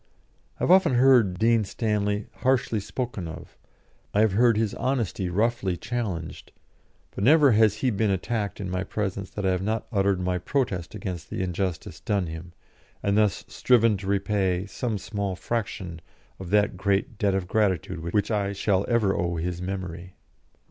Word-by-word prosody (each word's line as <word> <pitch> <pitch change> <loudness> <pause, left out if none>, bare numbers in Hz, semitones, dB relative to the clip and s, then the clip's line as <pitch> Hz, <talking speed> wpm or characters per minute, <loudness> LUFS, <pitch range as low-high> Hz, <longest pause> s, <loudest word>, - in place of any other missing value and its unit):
I - - -4
have - - +3
often 185 -8 +5
heard 120 -7 +5
Dean 115 +1 +3
Stanley 105 0 -1
harshly 130 -4 +1
spoken 105 -3 -4
of, 80 +1 -10 0.6
I 105 - +5
have 110 -2 +4
heard 115 +2 +4
his 110 -2 0
honesty 115 -8 -1
roughly 100 -1 0
challenged; 95 -6 -4 0.6
but 100 - -4
never 145 +2 +6
has 110 -1 +4
he 125 +3 0
been 105 0 +1
attacked 100 +1 -2
in 100 - -4
my 90 0 -1
presence 100 -1 -3
that 105 - -5
I 95 - +3
have 90 0 0
not 110 +3 -1
uttered 100 -3 +2
my 90 0 -1
protest 100 -5 -2
against 90 -4 -6
the - - -3
injustice 90 -2 -3
done 100 -3 0
him, 80 +1 -8 0.5
and 100 0 +1
thus 105 -4 +2
striven 115 -3 +3
to 95 0 -8
repay 95 -2 0
some 110 +2 -3
small 100 -1 -3
fraction 95 -5 -4 0.4
of 95 -2 -7
that 105 -1 +2
great 100 +5 0
debt 100 -2 +2
of 95 -2 -2
gratitude 95 -4 0
which 90 +7 -1
I 100 -2 0
shall 100 -1 +1
ever 110 -5 +2
owe 85 0 -1
his 85 +1 -3
memory. 90 -1 -5
100 Hz, 170 wpm, -26 LUFS, 90-110 Hz, 0.6 s, never